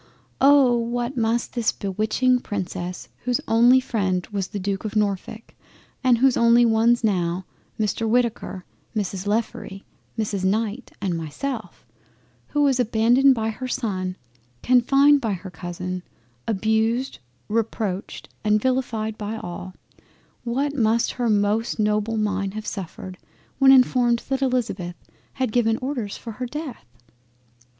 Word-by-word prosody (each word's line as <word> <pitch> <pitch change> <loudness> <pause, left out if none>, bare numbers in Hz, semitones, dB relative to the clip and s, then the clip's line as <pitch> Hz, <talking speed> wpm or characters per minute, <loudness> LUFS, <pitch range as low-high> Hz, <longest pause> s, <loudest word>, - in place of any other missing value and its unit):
Oh! 275 -3 +6
what 240 +2 -2
must 230 0 0
this 235 -3 +1
bewitching 215 +6 +1
Princess 185 -4 -5
whose 245 -1 0
only 240 +3 +6
freind 190 -8 -1
was 195 -2 -2
then - - -29
the - - -7
Duke 195 -1 -2
of 215 0 -5
Norfolk, 210 +2 -2 0.5
and 250 -2 +5
whose 260 +1 +4
only 235 +1 +5
ones 230 +1 +3
now 180 -3 0 0.3
Mr 220 +1 0
Whitaker, 235 -5 0 0.3
Mrs 195 -2 -3
Lefroy, 205 -2 -2 0.4
Mrs 205 -3 -2
Knight 215 +5 -1
and 185 -3 -1
myself, 220 - -5 0.6
who 295 0 +1
was 270 -3 +3
abandoned 245 +4 +4
by 220 -1 -1
her 255 +4 -6
son, 190 -8 -2 0.5
confined 275 +3 +5
by 220 -3 -1
her 185 0 -7
Cousin, 180 +2 -5 0.5
abused, 220 +4 0 0.3
reproached 215 -3 -2 0.2
and 210 0 +3
vilified 225 -3 -1
by 215 +1 -4
all, 180 -1 -7 0.7
what 270 +4 -1
must 230 -2 +2
not - - -14
her 240 -2 +1
most 210 +2 +1
noble 210 +1 0
mind 200 -2 -1
have 215 0 -5
suffered 185 -2 -6 0.4
when 270 -1 +7
informed 250 -2 +4
that 270 0 0
Elizabeth 230 -9 -1 0.4
had 260 -4 -1
given 225 -1 +2
orders 255 -6 -4
for 230 - -8
her 250 +3 -5
Death! 280 - -7
225 Hz, 135 wpm, -23 LUFS, 200-245 Hz, 0.7 s, when